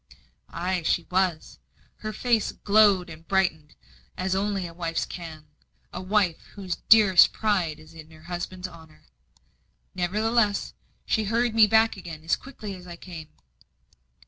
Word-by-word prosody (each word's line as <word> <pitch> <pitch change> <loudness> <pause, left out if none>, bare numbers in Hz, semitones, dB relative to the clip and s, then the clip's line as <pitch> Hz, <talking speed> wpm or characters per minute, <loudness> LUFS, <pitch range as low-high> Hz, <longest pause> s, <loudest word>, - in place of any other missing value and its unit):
Ay, 180 +1 -2
she 170 +1 +1
was. 185 -3 -1 0.4
Her 215 - -5
face 230 0 0
glowed 205 -3 +4
and 160 0 -12
brightened 175 -6 0 0.4
as 185 0 -1
only 195 -1 -1
a 170 - -8
wife's 165 -1 -2
can 160 -3 -9 0.5
a - - -5
wife 185 -3 +1
whose 190 -3 -4
dearest 205 -5 +7
pride 185 -8 0
is 155 +1 -16
in 160 -1 -12
her 155 -1 -17
husband's 180 +1 -5
honour. 160 -3 -16 0.9
Nevertheless, 210 +3 0 0.3
she 220 -1 0
hurried 230 +2 +1
me 220 -1 +6
back 220 0 +3
again 165 -4 -9
as 165 - +2
quickly 220 -7 -9
as 180 -1 -11
I 175 - -8
came. 170 -3 -10
185 Hz, 145 wpm, -26 LUFS, 165-210 Hz, 0.9 s, dearest